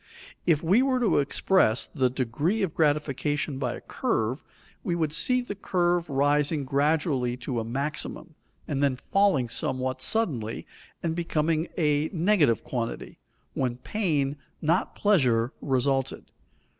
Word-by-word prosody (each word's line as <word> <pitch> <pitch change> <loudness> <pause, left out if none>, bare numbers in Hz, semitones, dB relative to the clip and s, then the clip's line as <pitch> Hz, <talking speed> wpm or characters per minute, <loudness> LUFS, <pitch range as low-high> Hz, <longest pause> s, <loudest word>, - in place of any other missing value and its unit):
If 160 -2 +3
we 190 +9 +4
were 260 -1 +2
to 230 -10 +3
express 140 - +2
the 130 -4 0
degree 140 - -1
of 180 - -1
gratification 145 -2 0
by - - -2
a - - -10
curve, 115 +6 -1 0.4
we 175 - -1
should 155 -3 -1
see 250 +9 +2
the 245 - -5
curve 175 -3 0
rising 145 +1 +1
gradually 140 -3 +1
to 125 -1 -3
a - - -2
maximum, 140 +7 -4 0.3
and 140 -2 -2
then 140 -2 +2
falling 190 -2 +2
somewhat 130 +2 -2
suddenly 130 - -1 0.4
and 165 -1 -1
becoming 165 -1 0
a 150 -2 +1
negative 170 - +3
quantity, 115 -3 -5 0.3
when 125 -2 -1
pain, 145 - -1 0.2
not 170 +6 0
pleasure, 130 - +2
resulted. 135 0 -1
150 Hz, 130 wpm, -26 LUFS, 130-170 Hz, 0.4 s, we